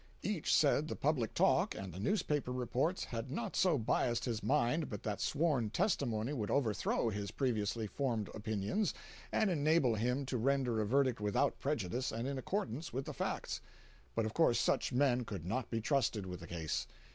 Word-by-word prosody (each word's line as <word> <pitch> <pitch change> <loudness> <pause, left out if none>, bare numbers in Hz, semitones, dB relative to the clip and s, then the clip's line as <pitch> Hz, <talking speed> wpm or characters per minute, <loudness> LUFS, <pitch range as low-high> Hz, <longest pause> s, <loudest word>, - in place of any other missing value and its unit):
Each 195 -5 -1
said 150 0 +4
the - - -3
public 135 -7 0
talk - - +3
and 95 -3 -6
the 90 - -7
newspaper 145 - 0
reports 125 +8 0
had 115 +1 -5
not 120 -3 -3
so 180 -5 +4
biased 120 0 +1
his 115 -3 -2
mind 150 +2 +1
but 105 -5 -6
that 105 -2 -2
sworn 145 -7 +1
testimony 120 - 0
would 110 -7 -2
overthrow 115 -3 +1
his 100 -1 -3
previously 115 -4 -1
formed 115 -2 -1
opinions 110 - -1 0.4
and 215 -3 +2
enable 150 -5 +3
him 125 +5 0
to 130 -2 -2
render 125 -2 +1
a 105 - -1
verdict 130 -2 +2
without 105 -1 +1
prejudice 130 -3 -1
and 115 +3 -3
in 140 -1 -2
accordance 155 - -3
with 135 +2 -3
the 150 - -5
facts. - - -3 0.5
But 110 - +1
of 110 - -3
course 160 -8 +4
such - - +1
men 125 -1 +3
could 100 -7 -6
not 110 +8 -2
be 115 - -1
trusted 115 -5 +1
with 90 -1 -6
the - - -9
case. 80 -8 -2
125 Hz, 180 wpm, -35 LUFS, 110-140 Hz, 0.5 s, said